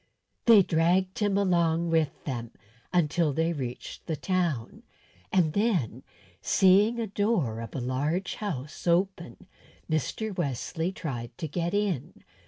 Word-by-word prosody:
They 220 -4 +8
dragged 180 +3 +1
him 205 -2 +2
along 170 -3 +2
with 160 -3 0
them 120 -4 -4 0.4
until 165 -3 +2
they 165 +3 +1
reached 125 -5 -6
the 160 - -1
town, 165 -7 -1 0.5
and 165 -5 +3
then, 200 - 0 0.4
seeing 200 +4 +4
the 230 -1 -2
door 200 - 0
of 115 -2 -7
a - - -1
large 145 +9 -1
house 150 -7 -5
open, 170 -6 0 0.4
Mr. 160 - -2
Wesley 165 +2 -2
tried 120 -10 -6
to 160 - -3
get 170 +4 -2
in. 205 -9 -2
170 Hz, 130 wpm, -28 LUFS, 145-190 Hz, 0.5 s, They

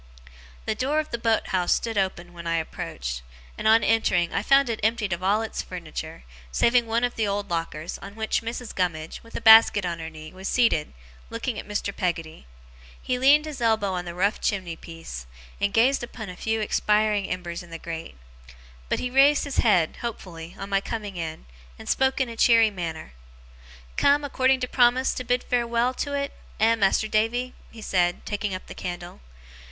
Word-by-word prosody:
The - - 0
door 285 +4 -1
of 310 - -4
the 235 - -2
boat 225 -1 +1
house 180 -2 +1
stood 230 -1 -3
open 185 -3 -2
when 170 -1 -8
I 165 - +1
approached; - - -4 0.3
and, - - -2
on 225 +1 +6
entering, 185 -6 +2
I - - +1
found 275 0 +4
it 230 -2 -2
emptied 220 -3 +1
of 175 - -4
all 205 +4 +2
its 220 - -4
furniture, 165 -2 -7 0.3
saving 235 - +3
one 230 +2 0
of 245 - +1
the 220 -2 0
old 200 -1 -2
lockers, 165 -1 -3
on 200 +1 -10
which 220 0 -1
Mrs. 230 +1 -5
Gummidge, 165 -4 -2
with 230 - -16
a - - -3
basket 220 -3 +8
on 170 -1 -3
her 160 0 -5
knee, 155 0 -11
was 190 +1 -6
seated, 225 - +2 0.4
looking 230 0 -3
at - - -9
Mr. 205 -1 -3
Peggotty. 165 - -3 0.5
He 250 -1 -2
leaned 290 +4 +5
his 300 -5 -7
elbow 220 -4 +2
on 180 -1 -3
the 170 -1 -6
rough 200 +4 +1
chimney 185 -5 -1
piece, 165 - -9 0.3
and 200 - +1
gazed 245 +6 +3
upon 230 -3 -7
a 180 - -7
few 220 +3 -1
expiring 210 -1 +1
embers 175 -1 -4
in 175 - -13
the 165 - -6
grate; 165 - -7 0.7
but - - +1
he 250 - -3
raised 275 +3 +5
his 285 -2 -4
head, 180 -8 +3
hopefully, 175 -7 -7
on 195 +1 -7
my 195 0 +2
coming 210 -2 -5
in, 160 -2 -5 0.3
and - - -11
spoke 265 +1 +2
in 260 - +1
a 230 - -7
cheery 230 -1 +5
manner. 165 - -6 0.8
'Come, 285 +1 +4
according 265 -1 +2
to 250 - -1
promise, 250 +1 +3
to 255 - -4
bid 245 0 0
farewell 240 0 +1
to 285 +2 -2
't, - - -22 0.3
eh, 225 +2 +5
Mas'r 215 0 +2
Davy?' 235 +4 0 0.2
he 225 -2 -11
said, 175 -3 0
taking 205 -2 -2
up 185 - -8
the - - -9
candle. 175 - -7
210 Hz, 195 wpm, -25 LUFS, 175-235 Hz, 0.8 s, basket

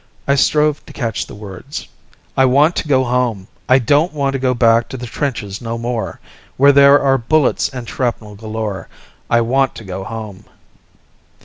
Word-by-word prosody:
I 140 - +3
strove 150 +1 +2
to - - -12
catch 115 -6 -3
the - - -11
words: 105 +6 -8 0.5
"I 135 - +4
want 145 +6 +3
to - - -2
go 130 -3 +3
home! 120 -6 -1 0.2
I 130 - +6
don't 145 +7 +2
want 140 -2 -1
to 135 - -2
go 125 -1 +1
back 115 -1 +3
to 130 - -6
the 125 - -6
trenches 115 -6 -4
no 115 0 -4
more, 120 -1 -4 0.4
Where 140 +2 +6
there 140 +1 +6
are 135 -1 +2
bullets 145 +4 +1
and 125 -3 -8
shrapnel 115 -5 -3
galore, 110 -1 -5 0.4
I 115 - +3
want 130 +3 +1
to - - -9
go 95 -1 -6
home!" 110 -2 -8
125 Hz, 180 wpm, -17 LUFS, 110-140 Hz, 0.5 s, I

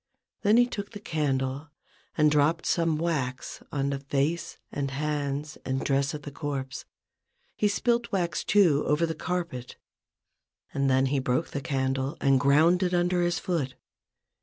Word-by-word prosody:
Then 210 +3 +4
he 245 - +6
took 205 -3 -6
the 205 - -7
candle 140 -4 -1 0.5
and 150 -1 +5
dropped 150 +3 +2
some 165 -2 +1
wax 150 -6 -2
on 140 -1 0
the 140 - -2
face 145 +4 -1
and 140 -1 -2
hands 145 +1 -3
and 130 0 -2
dress 140 +3 +1
of 150 - -8
the 145 - -7
corpse; 140 -2 -4 0.7
he 210 - +2
spilt 235 +3 0
wax, 170 -5 -1
too, 175 -8 +4
over 150 +3 +3
the 160 - -2
carpet, 170 -7 -4 1.0
and 140 -1 +1
then 130 0 +3
he 135 +1 +1
broke 130 +5 0
the 140 - -4
candle 135 0 -1
and 135 -1 +4
ground 155 +7 +4
it 180 -1 +1
under 175 0 +2
his 175 -1 +1
foot. 155 -8 -2
150 Hz, 160 wpm, -27 LUFS, 135-170 Hz, 1.0 s, he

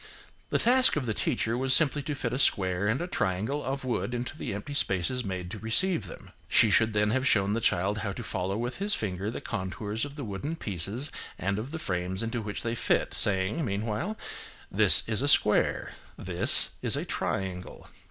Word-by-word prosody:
The - - +1
task 255 +2 +4
of 145 -4 -2
the 110 - -1
teacher 115 +2 -1
was 130 +1 +4
simply 145 -2 +2
to 145 +1 -4
fit 125 -3 -3
a 125 - -2
square 95 -5 +2
and 115 +5 +1
a - - -2
triangle 110 - -2
of 135 0 -4
wood 125 0 -2
into 125 +5 -4
the 155 - -5
empty 105 +9 -6
spaces 125 -2 0
made 90 -3 -5
to 110 - -6
receive 165 - 0
them. - - -11 0.2
She 110 - +5
should 110 +2 +3
then 105 0 +1
have 130 +3 +1
shown 100 -3 +2
the 115 - -1
child 100 +2 +1
how 100 -1 -3
to - - -7
follow 95 +2 -3
with 120 +2 -4
his 205 +2 +1
finger 100 -1 -3
the 115 - -6
contours 105 +2 -4
of 145 0 -6
the 145 - -6
wooden 115 +9 -4
pieces 105 - -3 0.3
and 100 +3 -2
of 115 +5 -6
the 160 - -5
frames 95 - -3
into 115 +1 -3
which 105 -1 -5
they 115 -1 -2
fit, 115 - 0
saying, 100 - +2
meanwhile, 115 - -3 0.5
"This - - +7
is 110 +1 +1
a 140 - 0
square–this 105 -7 +2
is - - +1
a - - -3
triangle." 90 -2 -4
110 Hz, 200 wpm, -28 LUFS, 100-135 Hz, 0.5 s, This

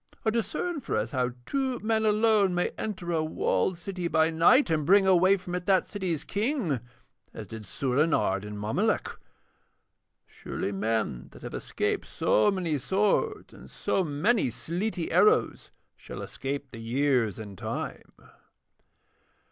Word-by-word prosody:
Or 220 - +3
discern 280 - -2
for 230 - -2
us 110 +2 -2
how 125 -1 0
two 265 - -1
men 220 0 0
alone 210 -3 +3
may 175 - +1
enter 185 -5 -4
a 160 -2 +1
walled 170 +3 0
city 180 0 -4
by 160 -1 +2
night, 170 - +5
and 155 -2 +1
bring 195 +5 +5
away 190 +1 +5
from 180 -1 -8
it 180 0 -3
that 190 -2 +4
city's 180 -7 -3
king, 205 - -1 0.6
as - - -6
did 110 -2 -9
Soorenard 125 -8 +1
and 105 0 -7
Mommolek. 105 +2 0 1.1
Surely 100 - -5
men 105 - -2
that - - -14
have - - -7
escaped - - -2
so 110 - +2
many 175 -7 -1
swords 210 - 0
and - - -13
so 190 - -1
many 170 - +1
sleety 175 - -3
arrows 435 +1 +3 0.3
shall - - -8
escape 140 0 -5
the 115 - -9
years 120 -2 +1
and 105 -3 -8
Time.' - - -5
175 Hz, 145 wpm, -28 LUFS, 130-205 Hz, 1.1 s, night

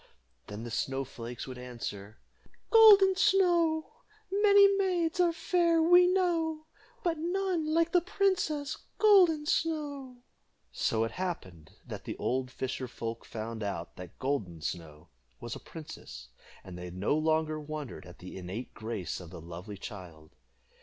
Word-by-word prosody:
Then 105 +2 -7
the 120 - -7
snow 135 +3 -1
flakes 120 -1 -7
would 130 -2 -8
answer: 110 -4 -7 0.5
"Golden 410 -4 +8
Snow, 355 -2 +2 0.3
Many 405 0 +6
maids 365 -3 0
are 350 -1 +4
fair, 335 0 +2
We 355 +2 +6
know, 335 -4 0 0.4
But 330 -3 0
none 355 -1 -1
like 330 +1 +2
the 355 - +4
princess 330 -6 0 0.2
Golden 360 -8 +5
Snow." 290 -6 -2 0.5
So 110 0 0
it 115 - -2
happened 95 - -6
that - - -8
the - - -5
old 130 0 -1
fisher 130 0 -4
folk 115 -1 -6
found 110 0 -6
out 95 -5 -4
that 90 -3 -10
Golden 120 - -2
Snow 80 -2 -6 0.3
was 120 -1 -6
a - - -8
princess, 65 - -10 0.3
and 95 -2 -10
they 90 0 -6
no 95 +9 0
longer 155 0 +1
wondered 150 -7 -7
at 90 - -13
the 90 +1 -9
innate 95 +7 -6
grace 110 -4 -4
of 90 -3 -10
the - - -9
lovely 85 +5 -8
child. 90 -7 -10
155 Hz, 145 wpm, -30 LUFS, -, 0.5 s, Golden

